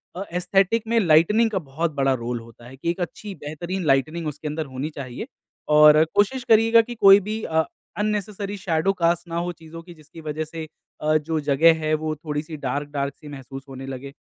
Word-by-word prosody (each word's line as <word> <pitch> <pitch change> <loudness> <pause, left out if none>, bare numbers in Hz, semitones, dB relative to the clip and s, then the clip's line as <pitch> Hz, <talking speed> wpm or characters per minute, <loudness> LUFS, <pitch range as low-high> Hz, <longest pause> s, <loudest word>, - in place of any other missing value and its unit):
अ, 190 - -4
aesthetic 195 +5 +1
में 230 0 +3
lightning 200 +6 +4
का 190 - 0
बहुत 160 +4 -1
बड़ा 135 0 +3
रोल 120 0 -3
होता 115 +1 -15
है 130 - -11
कि 170 - -3
एक 175 - -8
अच्छी 200 +3 -5
बेहतरीन 170 +5 -5
लाइटनिंग 155 +4 +1
उसके 150 +1 -5
अंदर 155 +1 -3
होनी 135 +2 -5
चाहिए 130 - -6 0.5
और 150 0 +8
कोशिश 235 +5 +2
करिएगा 225 +1 +6
कि 240 +1 -8
कोई 195 -2 +8
भी 220 +1 -3
अ, 160 0 +1 0.3
अननेसेसरी 210 -1 -2
शैडो 180 +1 0
कास्ट 170 -1 0
ना 170 0 -4
हो - - -2
चीज़ों 165 -1 -11
की 175 -1 -12
जिसकी 155 +1 -14
वजह 155 0 -3
से 160 0 -7 0.3
अ, 155 0 +3
जो 155 +1 -2
जगह 155 +3 +4
है 155 - +1
वो 155 0 -1
थोड़ी 150 -1 -4
सी 155 -1 -8
डार्क-डार्क 140 +1 -3
सी 150 - -14
महसूस 135 -1 -9
होने 135 0 -8
लगे 135 +1 -7
160 Hz, 200 wpm, -23 LUFS, 145-190 Hz, 0.5 s, और